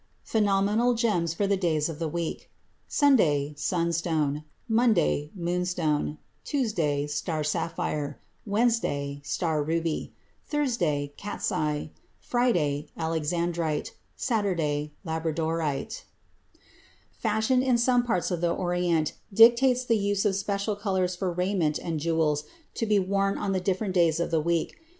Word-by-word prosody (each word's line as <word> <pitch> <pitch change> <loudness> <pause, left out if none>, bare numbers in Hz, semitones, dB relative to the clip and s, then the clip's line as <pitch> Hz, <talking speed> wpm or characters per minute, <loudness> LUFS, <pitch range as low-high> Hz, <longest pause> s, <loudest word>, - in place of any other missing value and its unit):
PHENOMENAL 210 +3 +2
GEMS 180 -8 +1
FOR 200 - +1
THE 200 0 +2
DAYS 160 -5 +1
OF 165 -2 -6
THE 165 - -1
WEEK 165 +1 -4 0.4
Sunday 150 - +3
Sunstone 160 -3 0 0.2
Monday 220 -10 +2
Moonstone 175 -4 -1 0.3
Tuesday 170 - 0
Star 155 +1 -2
sapphire 150 -2 -2 0.3
Wednesday 200 -11 0
Star 155 +1 -1
ruby 165 +1 -1 0.4
Thursday 175 - 0
Cat's 205 +1 -3
eye 150 -4 -1 0.3
Friday 165 - +1
Alexandrite 165 0 -1 0.2
Saturday 165 - -1
Labradorite 160 - -2 1.1
Fashion 220 +3 +1
in 255 -2 +3
some 245 +1 +3
parts 220 -9 -1
of 175 -2 -2
the 175 - +2
Orient 175 -3 0 0.2
dictates 240 +4 +6
the 230 -3 +2
use 200 0 0
of 200 -2 +2
special 200 +1 -1
colors 190 -3 -1
for 180 0 -2
raiment 180 -3 0
and 165 -3 -3
jewels 155 -2 +1 0.3
to 225 - -2
be 210 -1 +4
worn 195 +1 +1
on 195 - -2
the 190 -1 0
different 190 +1 -1
days 170 -3 +3
of 170 - -1
the 160 -2 +2
week. 170 - -1
175 Hz, 125 wpm, -27 LUFS, 155-205 Hz, 1.1 s, dictates